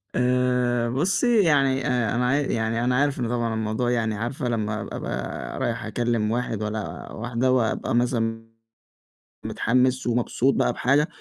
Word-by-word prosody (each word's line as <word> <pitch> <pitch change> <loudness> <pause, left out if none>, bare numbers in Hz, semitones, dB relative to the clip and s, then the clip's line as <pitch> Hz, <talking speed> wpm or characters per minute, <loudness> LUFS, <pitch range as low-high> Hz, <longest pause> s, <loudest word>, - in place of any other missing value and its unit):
آآ، 125 -1 +1
بُصّي 195 - +2
يعني 135 -4 +2
آآ 120 -4 0
أنا 125 +1 +1
عا 130 - +2
يعني 115 -5 0
أنا 125 +1 +1
عارف 140 +1 +1
إنه 120 - -1
طبعًا 115 -2 -1
الموضوع 110 +3 -1
يعني 110 -3 0
عارفة 120 +5 -3
لمّا 110 -2 -2
أبقى 65 +1 -5
رايح - - -2
أكلّم 115 -3 0
واحد 115 -3 -2
والّا 105 0 -5
واحدة 120 +2 -1
وأبقى 115 -2 +1
مثلًا 115 -2 0 1.0
متحمس 130 +1 +1
ومبسوط 120 +2 +1
بقى - - +2
بحاجة، 145 +4 +2
120 Hz, 145 wpm, -24 LUFS, 115-130 Hz, 1.0 s, بُصّي